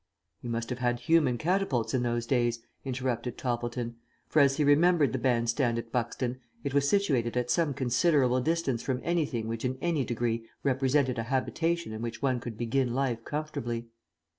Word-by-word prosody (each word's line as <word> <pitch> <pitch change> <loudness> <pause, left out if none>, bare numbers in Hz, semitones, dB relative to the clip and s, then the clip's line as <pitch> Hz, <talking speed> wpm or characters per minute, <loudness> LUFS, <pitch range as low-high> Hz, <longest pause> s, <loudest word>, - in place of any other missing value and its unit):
"You 120 - -6
must 115 +1 -3
have 125 - -3
had 120 -1 0
human 160 -7 +3
catapults 165 - 0
in 130 - +2
those 120 -1 -1
days," 120 -2 +1 0.2
interrupted 125 -2 -2
Toppleton, 120 -1 -3 0.3
for 155 - +2
as 140 -1 +5
he 150 - +2
remembered 150 +1 +4
the 130 - -1
band 120 -2 +1
stand 120 -2 +1
at 115 -1 -5
Buxton, 125 +1 -2 0.2
it 140 - -2
was 140 0 +3
situated 135 - +1
at 125 0 0
some 150 -1 +1
considerable 130 0 +2
distance 155 -5 0
from 130 -2 -1
anything 145 -9 0
which 115 0 -4
in 130 0 -1
any 165 -5 0
degree 115 -1 -2
represented 130 -1 +2
a - - -1
habitation 165 +2 0
in 110 - -5
which 115 0 -4
one 130 -2 +1
could 120 -2 -7
begin 120 +1 0
life 125 -4 0
comfortably. 120 -6 -4
125 Hz, 180 wpm, -29 LUFS, 120-140 Hz, 0.3 s, as